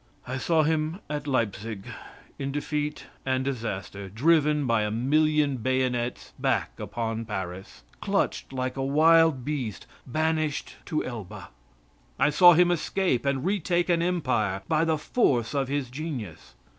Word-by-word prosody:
I 125 +2 -4
saw 160 +2 +2
him 155 +2 0
at 145 -1 -3
Leipzig 110 -5 -2 0.5
in 135 0 -2
defeat 150 +1 -3 0.2
and 130 0 0
disaster 100 -6 -4
driven 150 - +3
by 115 -3 +2
a 105 - 0
million 145 +4 +2
bayonets 125 0 -1
back - - 0
upon 115 -1 -3
Paris 95 -3 -6 0.2
clutched - - -1
like 130 -1 -3
a 135 - -1
wild 155 -1 +4
beast 130 -10 -3 0.2
banished 155 +2 -1
to 155 -3 -1
Elba. 110 -7 -7 0.7
I 150 +2 +3
saw 175 +4 +8
him 175 +1 +4
escape 175 -5 0
and 140 +1 0
retake 180 -2 +1
an 170 -1 +3
empire 130 - 0
by 160 0 +2
the 160 -1 +1
force 140 - +1
of 140 -2 0
his 135 -2 -2
genius. 130 - -6
140 Hz, 140 wpm, -26 LUFS, 120-155 Hz, 0.7 s, saw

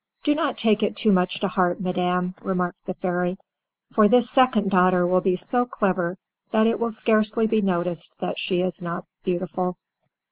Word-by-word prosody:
"Do 295 - +3
not 295 -3 -1
take 220 -1 +2
it 210 - 0
too 215 - +3
much 180 -1 +1
to 200 - +1
heart, 180 -2 0
madam," 180 -1 -1
remarked 180 -1 -3
the 185 - -4
fairy, 180 0 -2 0.5
"for 215 -2 +4
this 245 +2 +4
second 240 -7 +3
daughter 180 -1 +4
will 185 +1 +2
be 185 -1 +1
so 245 +7 0
clever 185 -5 -1 0.3
that 220 -1 +3
it 230 0 +1
will 235 0 0
scarcely 220 0 +1
be 220 0 +1
noticed 175 -3 -2
that - - -3
she 180 -2 0
is 185 +1 -3
not 175 +1 -5 0.2
beautiful." 180 0 -2
185 Hz, 180 wpm, -23 LUFS, 180-220 Hz, 0.5 s, for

